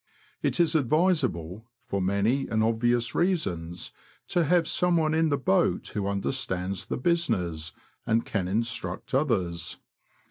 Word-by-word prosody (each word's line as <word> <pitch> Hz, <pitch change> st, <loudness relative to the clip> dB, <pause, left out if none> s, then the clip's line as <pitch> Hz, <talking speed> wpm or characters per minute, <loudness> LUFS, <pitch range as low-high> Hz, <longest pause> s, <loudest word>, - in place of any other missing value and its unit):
It -, -, 0 dB
is 170 Hz, -2 st, +4 dB
advisable, 130 Hz, -, +1 dB, 0.2 s
for 100 Hz, -6 st, -2 dB
many 100 Hz, +8 st, +1 dB
and 110 Hz, -1 st, +1 dB
obvious 115 Hz, +1 st, +1 dB
reasons, 90 Hz, -, -1 dB, 0.4 s
to 175 Hz, -2 st, +2 dB
have 170 Hz, +1 st, +3 dB
someone 165 Hz, -3 st, +2 dB
in 160 Hz, 0 st, +2 dB
the 140 Hz, -, +1 dB
boat 120 Hz, -7 st, +1 dB
who 100 Hz, -1 st, -2 dB
understands 100 Hz, -2 st, -2 dB
the -, -, -2 dB
business, 110 Hz, -, 0 dB, 0.4 s
and 115 Hz, +1 st, +2 dB
can 95 Hz, -4 st, -2 dB
instruct 115 Hz, +7 st, -3 dB
others. 90 Hz, -, 0 dB
115 Hz, 130 wpm, -27 LUFS, 95-155 Hz, 0.4 s, is